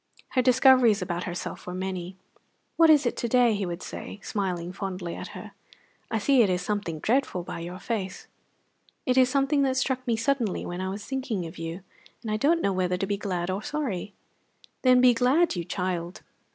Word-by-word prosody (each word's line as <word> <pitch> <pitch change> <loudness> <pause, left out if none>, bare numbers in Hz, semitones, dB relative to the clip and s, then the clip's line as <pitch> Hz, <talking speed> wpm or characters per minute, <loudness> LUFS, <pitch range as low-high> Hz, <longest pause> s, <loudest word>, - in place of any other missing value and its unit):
Her 255 - +2
discoveries 250 -4 +5
about 175 0 -3
herself 175 0 -6
were 180 - -4
many. 185 -1 -4 0.6
"What 330 -1 +6
is 295 -3 +6
it 240 - 0
to 235 - -1
day?" 245 -1 +4
he 200 -2 -2
would 175 +1 -5
say, 205 - -7
smiling 180 -4 -3
fondly 185 -3 -5
at - - -8
her. - - -9 0.6
"I 225 - 0
see 260 +4 +4
it 210 - +4
is 180 -1 0
something 205 -6 -2
dreadful 220 - 0
by 170 - -6
your 175 +2 -6
face." 190 -1 -4 0.8
"It 255 - +2
is 255 -1 +5
something 275 +2 +2
that 265 -1 +1
struck 260 -1 -1
me 235 - +2
suddenly 230 -3 0
when 175 +1 -4
I 190 - -2
was 200 +2 -6
thinking 255 -9 -3
of 165 0 -9
you, 165 +3 -5 0.4
and 220 - -3
I 215 - +1
don't 330 +9 +2
know 200 - +2
whether 180 -1 0
to 195 - -1
be 200 +1 -1
glad 185 -3 -2
or 190 +2 -2
sorry." 215 -9 -3 0.7
"Then 255 -1 +5
be 250 -1 +7
glad, 260 +8 +3
you 175 - -2
child." 180 0 -3
205 Hz, 200 wpm, -26 LUFS, 180-255 Hz, 0.8 s, be